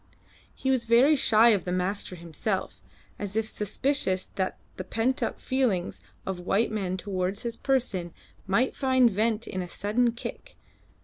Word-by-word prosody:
He 265 - 0
was 255 -3 +1
very 245 +6 +5
shy 230 -3 +5
of 205 -6 +3
the 180 - -3
master 185 +1 -2
himself, 170 +4 -3 0.4
as 205 0 -4
if 220 0 +1
suspicious 210 -2 0
that 190 -1 -2 0.2
the 185 - -4
pent 230 +7 0
up - - -2
feelings 240 -9 0 0.2
of 190 -1 -3
the - - -9
white 200 +6 +1
man 190 -4 -2
towards 190 +1 -2
his 235 -1 -3
person 230 -11 0 0.4
might 230 +7 +2
find 260 -3 +4
vent 220 +2 0
in 185 - -4
a 180 - -5
sudden 225 +6 +1
kick. - - -8
210 Hz, 165 wpm, -27 LUFS, 185-240 Hz, 0.4 s, very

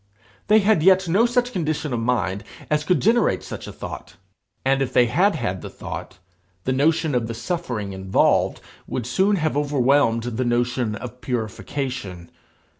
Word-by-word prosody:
They 215 +1 +6
had 200 -4 +3
yet 190 +1 +5
no 200 +8 +4
such 245 +1 +1
condition 155 - -2
of 120 - 0
mind 115 -4 -1 0.3
as 150 0 +2
could 180 +3 +2
generate 230 +3 +2
such - - -7
a - - -6
thought. - - -8 0.5
And 135 +1 +2
if 135 - -1
they 125 - +5
had 175 - +2
had 95 - -3
the - - -7
thought, 95 - -8 0.5
the 130 - 0
notion 155 +2 +2
of 120 -2 0
the 115 - -5
suffering 115 - -3
involved 95 0 +1 0.3
would 120 - -3
soon 190 - +2
have 155 -5 -1
overwhelmed 140 -4 +2
the 120 +1 -2
notion 120 -2 0
of 125 +2 -8
purification. 115 -5 -4
130 Hz, 165 wpm, -23 LUFS, 115-165 Hz, 0.5 s, They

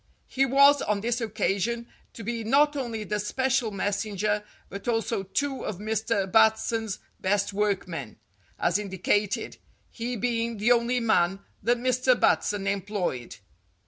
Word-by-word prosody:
He 270 +1 +1
was, 280 +2 +6
on 210 -1 0
this 240 +2 -1
occasion, 220 +1 -1 0.3
to 225 - -9
be 230 +1 -3
not 290 +6 +3
only 235 -6 -3
the 210 0 -2
special 260 +3 0
messenger, 205 +1 -1 0.2
but 200 +3 -8
also 225 -2 0
two 270 +8 -2
of 205 - -4
Mr. 220 0 -1
Bat 220 +1 +6
son's 220 -3 -3 0.2
best 200 +1 0
workmen, 185 - -2 0.4
as - - +1
indicated, 205 +1 -1 0.3
he 240 +1 -4
being 230 0 -1
the 215 +4 +2
only 240 +1 +3
man 195 -4 +2 0.2
that 240 +4 +2
Mr. 255 0 +2
Batson 205 -2 +2
employed. 195 - -2
220 Hz, 140 wpm, -27 LUFS, 200-240 Hz, 0.4 s, was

